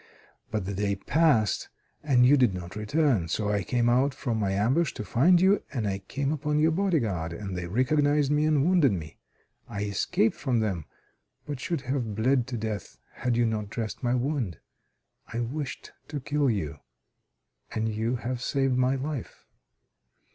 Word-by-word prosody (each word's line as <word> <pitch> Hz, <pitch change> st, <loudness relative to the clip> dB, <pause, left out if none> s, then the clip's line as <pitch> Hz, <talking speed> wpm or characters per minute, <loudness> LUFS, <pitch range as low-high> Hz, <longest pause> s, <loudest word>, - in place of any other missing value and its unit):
But 105 Hz, -3 st, -2 dB
the 100 Hz, -, -3 dB
day 100 Hz, +1 st, 0 dB
passed 130 Hz, -1 st, +2 dB, 0.3 s
and 130 Hz, -5 st, +4 dB
you 140 Hz, +3 st, +7 dB
did 125 Hz, -8 st, +3 dB
not 90 Hz, +1 st, -7 dB
return. 110 Hz, -, +1 dB
So 105 Hz, +4 st, -1 dB
I 100 Hz, -1 st, +1 dB
came 120 Hz, +6 st, 0 dB
out 130 Hz, +3 st, +3 dB
from 120 Hz, -6 st, -2 dB
my 100 Hz, -2 st, 0 dB
ambush 125 Hz, +12 st, +1 dB
to 105 Hz, -, -5 dB
find 165 Hz, -, +4 dB
you, 190 Hz, +3 st, +4 dB
and 120 Hz, -7 st, -2 dB
I 95 Hz, -1 st, -1 dB
came 140 Hz, +8 st, -2 dB
upon 150 Hz, 0 st, -1 dB
your 155 Hz, +2 st, +4 dB
bodyguard, 120 Hz, -, 0 dB
and 95 Hz, +1 st, -5 dB
they 90 Hz, -1 st, -4 dB
recognized 145 Hz, -, +2 dB
me, 150 Hz, +1 st, +3 dB
and 150 Hz, -2 st, +3 dB
wounded 170 Hz, -, +4 dB
me. 80 Hz, -5 st, -6 dB, 0.5 s
I 100 Hz, 0 st, -3 dB
escaped 180 Hz, -, +1 dB
from 125 Hz, -4 st, 0 dB
them, 95 Hz, -8 st, -1 dB, 0.6 s
but 145 Hz, -3 st, -5 dB
should 165 Hz, 0 st, -2 dB
have 125 Hz, -5 st, -2 dB
bled 125 Hz, +3 st, +2 dB
to 125 Hz, -2 st, -3 dB
death 110 Hz, -2 st, -5 dB, 0.2 s
had 120 Hz, -2 st, -1 dB
you 120 Hz, -, +3 dB
not 110 Hz, -2 st, -2 dB
dressed 110 Hz, 0 st, -4 dB
my 120 Hz, -1 st, +1 dB
wound. 125 Hz, -, -1 dB, 0.7 s
I 115 Hz, -, -3 dB
wished 135 Hz, +3 st, -5 dB, 0.2 s
to 145 Hz, 0 st, -4 dB
kill 145 Hz, +1 st, +1 dB
you, 95 Hz, -11 st, -2 dB, 0.9 s
and 110 Hz, 0 st, -1 dB
you 110 Hz, +3 st, -1 dB
have 125 Hz, 0 st, -4 dB
saved 135 Hz, -1 st, +1 dB
my 130 Hz, +1 st, +2 dB
life. 135 Hz, -1 st, -5 dB
125 Hz, 175 wpm, -27 LUFS, 105-145 Hz, 0.9 s, you